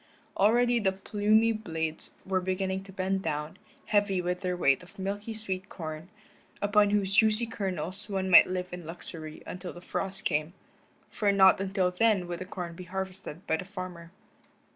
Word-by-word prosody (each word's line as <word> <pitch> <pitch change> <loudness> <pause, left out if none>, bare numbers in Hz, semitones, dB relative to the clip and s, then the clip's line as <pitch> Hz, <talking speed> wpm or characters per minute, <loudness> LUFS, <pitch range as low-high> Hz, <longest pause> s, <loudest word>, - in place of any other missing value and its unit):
Already 240 +4 +4
the 195 -3 +2
plumy 210 +3 +2
blades 160 -8 -4
were 190 -1 0
beginning 190 +1 -1
to 195 - -11
bend 190 0 -1
down, 150 -2 -3 0.3
heavy 205 -3 +2
with 180 +1 -2
their 180 -1 -1
weight 140 -6 +3
of 180 +3 -16
milky 200 +3 -4
sweet 190 -3 -3
corn, 160 0 -7 0.5
upon 205 0 +4
whose 200 -1 +1
juicy 220 +2 +5
kernels 190 -2 -3
one 190 -1 -1
might 185 - +8
live 180 -1 -3
in 180 -1 -6
luxury 160 -2 -8
until 180 0 -6
the 175 - -10
frost 195 +2 -4
came, 155 +1 0 0.6
for 205 -2 +2
not 190 -1 +6
until 190 -2 +1
then 200 -1 +2
would 175 -1 -4
the 185 - -5
corn 175 -2 -6
be 180 - -9
harvested 190 -1 -6
by 160 - +1
the - - -5
farmer. 185 -3 -7
190 Hz, 170 wpm, -29 LUFS, 180-200 Hz, 0.6 s, might